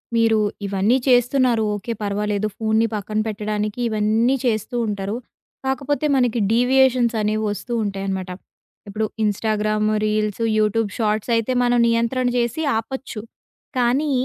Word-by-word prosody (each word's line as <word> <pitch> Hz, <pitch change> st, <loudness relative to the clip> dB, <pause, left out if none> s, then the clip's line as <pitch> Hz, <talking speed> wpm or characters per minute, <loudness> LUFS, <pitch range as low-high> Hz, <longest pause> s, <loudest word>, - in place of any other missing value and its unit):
మీరు 225 Hz, -1 st, +3 dB, 0.3 s
ఇవన్నీ 200 Hz, +5 st, +2 dB
చేస్తున్నారు. 245 Hz, -2 st, +3 dB
ఓకే, 220 Hz, +3 st, -4 dB
పర్వాలేదు. 205 Hz, +1 st, -1 dB
ఫోన్‌ని 220 Hz, 0 st, +2 dB
పక్కన 215 Hz, +1 st, -2 dB
పెట్టడానికి 210 Hz, +1 st, -3 dB
ఇవన్నీ 220 Hz, +4 st, +2 dB
చేస్తూ 220 Hz, +1 st, -1 dB
ఉంటారు. 200 Hz, 0 st, -3 dB, 0.5 s
కాకపోతే 275 Hz, +3 st, -1 dB
మనకి 245 Hz, -3 st, +2 dB
డీవియేషన్స్ 250 Hz, 0 st, +3 dB
అనేవి 215 Hz, +1 st, 0 dB
వస్తూ 210 Hz, +4 st, -5 dB
ఉంటాయనమాట. 195 Hz, -2 st, -3 dB, 0.6 s
ఇప్పుడు 215 Hz, +2 st, -2 dB, 0.2 s
ఇన్‌‌‌‌‌‌‌‌స్టాగ్రామ్ 215 Hz, 0 st, 0 dB, 0.2 s
రీల్స్, 215 Hz, 0 st, -1 dB, 0.2 s
యూట్యూబ్ 215 Hz, 0 st, +1 dB
షార్ట్స్ 215 Hz, +1 st, 0 dB
అయితే, 230 Hz, +2 st, 0 dB
మనం 245 Hz, 0 st, +2 dB
నియంత్రణ 235 Hz, +2 st, +1 dB
చేసి 240 Hz, +5 st, 0 dB, 0.2 s
ఆపొచ్చు. 225 Hz, 0 st, -5 dB, 0.6 s
కానీ 260 Hz, +5 st, +2 dB
220 Hz, 120 wpm, -21 LUFS, 210-245 Hz, 0.6 s, మీరు